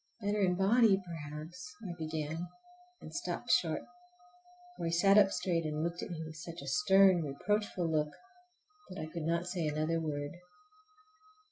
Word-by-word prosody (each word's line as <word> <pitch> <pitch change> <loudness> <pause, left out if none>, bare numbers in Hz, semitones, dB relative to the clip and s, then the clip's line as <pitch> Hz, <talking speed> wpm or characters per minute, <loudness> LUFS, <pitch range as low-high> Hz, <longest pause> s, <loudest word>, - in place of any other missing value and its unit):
"Better 205 -1 0
in 180 -2 +3
body 200 +1 +5
perhaps"—I 170 +4 -7
began, 160 +1 -3 0.5
and - - -10
stopped - - -3
short, - - +2 0.9
for - - -4
he 165 - 0
sat 195 +4 +5
up 200 -2 +6
straight 180 -2 0
and 155 0 -2
looked 170 +1 -2
at - - -5
me 165 -2 -5
with 155 0 -9
such 170 0 -8
a - - -9
stern, 185 +4 +5
reproachful 180 +5 -1
look 155 -2 +1 0.8
that 185 - -8
I 155 - -3
could 165 -2 -3
not 170 +1 +1
say 180 -3 -2
another 155 +2 0
word. 145 -2 -3
170 Hz, 155 wpm, -33 LUFS, 155-185 Hz, 0.9 s, up